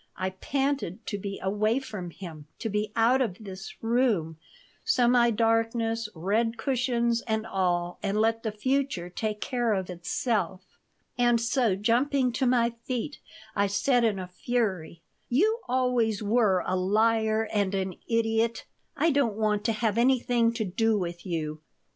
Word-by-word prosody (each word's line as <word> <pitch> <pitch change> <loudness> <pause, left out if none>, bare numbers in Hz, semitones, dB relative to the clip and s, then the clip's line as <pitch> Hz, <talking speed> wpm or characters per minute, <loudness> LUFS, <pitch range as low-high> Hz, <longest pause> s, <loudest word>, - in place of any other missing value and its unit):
I 185 0 -2
panted 265 -1 -2
to 205 - -3
be 200 0 -5
away 210 +4 +1
from 210 -9 -5
him, 160 -4 -10
to 225 - -3
be 210 0 -1
out 235 +4 +4
of 205 -8 -1
this 190 -3 -8
room, 225 -10 +1 0.4
semi 245 - +4
darkness, 225 0 +1
red 220 +7 0
cushions, 240 -3 0
and 220 -1 0
all, 180 -4 -1
and 205 +1 0
let 225 +1 +2
the 220 - -2
future 215 -5 -1
take 215 +2 -3
care 240 -2 0
of 185 -1 -3
itself. 185 +1 -2 0.5
And 240 -1 +4
so, 230 -3 +1
jumping 250 +5 +2
to 255 +2 0
my 240 -1 +3
feet, 255 +4 -3 0.4
I 200 0 +2
said, 235 +6 +2
in 220 -4 +2
a 185 - -4
fury: 180 -5 -2 0.3
"You 425 - +2
always 245 -4 +1
were 210 -4 +3
a 185 - 0
liar 220 +3 +2
and 200 -2 +1
an 190 -1 -1 0.2
idiot. 230 0 +1 0.3
I 330 - +3
don't 275 -7 +1
want 210 -1 +1
to 230 - +3
have 220 0 0
anything 240 -2 +3
to 225 -2 -2
do 220 +4 +1
with 175 -1 -4
you." 155 -3 -3
225 Hz, 155 wpm, -27 LUFS, 195-240 Hz, 0.5 s, out